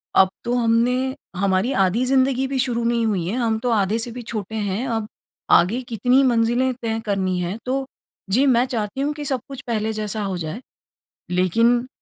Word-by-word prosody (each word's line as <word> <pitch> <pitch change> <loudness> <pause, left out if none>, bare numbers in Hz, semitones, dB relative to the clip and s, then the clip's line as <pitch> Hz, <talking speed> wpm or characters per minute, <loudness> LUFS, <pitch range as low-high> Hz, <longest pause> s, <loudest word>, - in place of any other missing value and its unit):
अब 190 - +6
तो 240 - -1
हमने 235 +1 +2 0.4
हमारी 195 +5 +1
आधी 225 +8 0
ज़िन्दगी 265 0 +2
भी 265 0 -2
शुरू 245 -2 0
नहीं 235 -1 +1
हुई 195 -6 0
है, 200 - -2
हम 225 -3 0
तो 245 - -1
आधे 215 0 +1
से 235 +1 -3
भी 245 - -7
छोटे 220 -2 -5
हैं, 210 +4 -2
अब 225 -3 -2 0.4
आगे 220 +9 +4
कितनी 250 +4 +3
मंजिलें 240 +1 +2
तय 225 0 -1
करनी 190 -3 0
है, 180 +4 -3
तो 265 +1 -1 0.4
जी, 250 +8 +3
मैं 250 -2 +4
चाहती 230 0 -3
हूँ 290 +2 0
कि 295 0 -7
सब 265 -2 0
कुछ 275 -1 -8
पहले 220 -1 -1
जैसा 215 0 -3
हो 190 -2 -2
जाए। 175 +8 -5 0.7
लेकिन 230 +7 +2
230 Hz, 190 wpm, -22 LUFS, 205-250 Hz, 0.7 s, अब